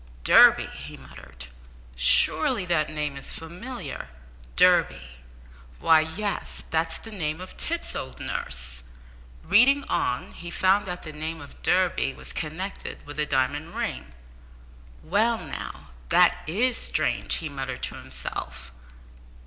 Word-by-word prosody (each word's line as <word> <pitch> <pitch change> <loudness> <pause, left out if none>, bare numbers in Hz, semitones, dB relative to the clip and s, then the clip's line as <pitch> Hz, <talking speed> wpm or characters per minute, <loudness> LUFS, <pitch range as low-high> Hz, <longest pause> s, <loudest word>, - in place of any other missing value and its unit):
"Durby!" - - +7
he - - -9
muttered. - - -11 0.5
"Surely 160 - +4
that 170 -4 +1
name 150 -2 -3
is 140 - -5
familiar? 175 - -7 0.5
Durby! - - +3 0.6
why, 160 - +6
yes 185 +6 -3
that's 160 0 0
the 225 - -11
name 160 -6 -3
of 185 0 -9
Tipps's 335 +1 -2
old 130 - -6
nurse." 65 -1 -4 0.6
Reading 250 - +5
on, 125 - -1
he 175 - -8
found 190 +3 +2
that 180 0 -5
the 155 - -7
name 160 +2 -4
of 145 -2 -13
Durby 180 -7 +2
was - - -8
connected 170 +5 -5
with 145 +1 -8
a 150 - +1
diamond 145 +6 -1
ring. 65 - -4 0.9
"Well, 220 +7 +2
now, - - -7 0.2
that - - +5
is 230 +8 +2
strange!" - - +1
he 160 - -3
muttered 135 -3 -5
to - - -1
himself. 60 - -6
160 Hz, 130 wpm, -26 LUFS, 140-190 Hz, 0.9 s, Durby